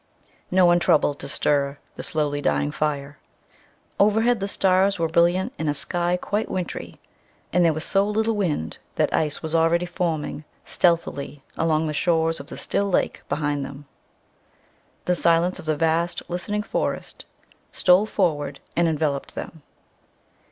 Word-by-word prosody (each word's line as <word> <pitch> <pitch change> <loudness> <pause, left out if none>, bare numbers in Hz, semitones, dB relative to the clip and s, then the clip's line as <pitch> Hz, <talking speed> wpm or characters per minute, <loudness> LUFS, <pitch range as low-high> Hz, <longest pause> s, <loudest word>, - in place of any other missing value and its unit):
No 185 0 +4
one 175 0 +5
troubled 155 -4 +2
to 140 - -7
stir 140 0 0 0.2
the - - -6
slowly 145 -2 -1
dying 70 - +1
fire. 145 - -3 0.8
Overhead 220 +3 +3
the 195 - -2
stars 195 0 +2
were 165 -1 +1
brilliant 175 +3 +2
in 160 - -2
a 145 - +1
sky 175 +4 0
quite 210 +4 -2
wintry, 180 -3 -5 0.5
and 180 +1 +4
there 165 - +5
was 155 +1 -2
so 195 +1 +2
little 220 +1 +1
wind 155 - -2 0.2
that - - +1
ice 150 0 0
was 160 0 -3
already 165 +1 +3
forming 165 -4 -3 0.2
stealthily 150 -5 0
along 160 -1 +1
the 155 - -2
shores 165 0 +1
of 140 - -9
the - - -8
still 200 0 0
lake 185 - 0
behind 145 -2 -1
them. 140 +1 -9 1.2
The 180 - +2
silence 170 +1 +2
of 180 - -10
the 155 -1 +1
vast 165 +2 0
listening 205 +4 -2
forest - - -3 0.5
stole 185 +4 +4
forward 145 -9 -1 0.2
and 170 0 +3
enveloped 150 -3 -1
them. 160 - -7
165 Hz, 150 wpm, -24 LUFS, 150-180 Hz, 1.2 s, one